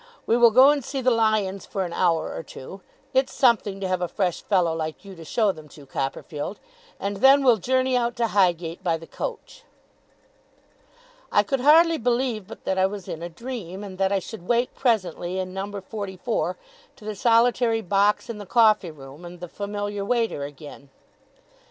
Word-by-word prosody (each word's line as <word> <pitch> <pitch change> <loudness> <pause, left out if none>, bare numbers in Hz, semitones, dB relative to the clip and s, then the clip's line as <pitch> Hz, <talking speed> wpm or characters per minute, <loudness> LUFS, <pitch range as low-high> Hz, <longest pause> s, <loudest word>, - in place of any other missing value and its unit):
We 230 - +2
will 240 -1 +7
go 260 +5 +7
and 290 -2 -1
see 270 +2 -4
the 255 0 +2
lions 215 -4 +1
for 195 -2 -2
an 170 - -6
hour 170 -3 +1
or - - -5
two 165 +5 -11 0.3
it's 265 0 +2
something 225 -6 +2
to 195 - -2
have 185 -1 -1
a 180 - 0
fresh 180 -1 -1
fellow 180 -5 +1
like 160 +3 -5
you 195 - -9
to 165 -3 -11
show 210 +5 +1
them 155 -4 -13
to, 145 -1 -14
Copperfield 145 +6 -4 0.4
and 200 0 -3
then 270 +5 +6
we'll 245 -4 +5
journey 255 +4 +1
out 240 -1 0
to 235 - +1
Highgate 175 -3 +1
by 170 -3 +1
the 165 - -12
coach.' - - -7 1.7
I 205 - +4
could 270 +6 -1
hardly 320 +4 +5
believe 235 -4 -1
but - - -11
that 190 0 0
I 190 - +4
was 200 -1 -8
in 160 - -6
a 170 - -5
dream, 200 -1 -7
and 190 -2 -9
that 195 0 +2
I 200 - +2
should 190 -2 -8
wake 240 +1 +1
presently 185 - -1
in 185 -1 -4
number 200 +1 -5
forty 195 -1 -6
four, 230 +6 -2 0.4
to 210 - -15
the 215 - -3
solitary 230 +1 +3
box 200 +2 +2
in 230 -3 -6
the 205 - -9
coffee 215 -5 +4
room 140 +1 -12
and 175 0 -10
the 180 - -7
familiar 205 +2 -4
waiter 225 -8 0
again. 145 -1 -11
200 Hz, 195 wpm, -24 LUFS, 180-235 Hz, 1.7 s, will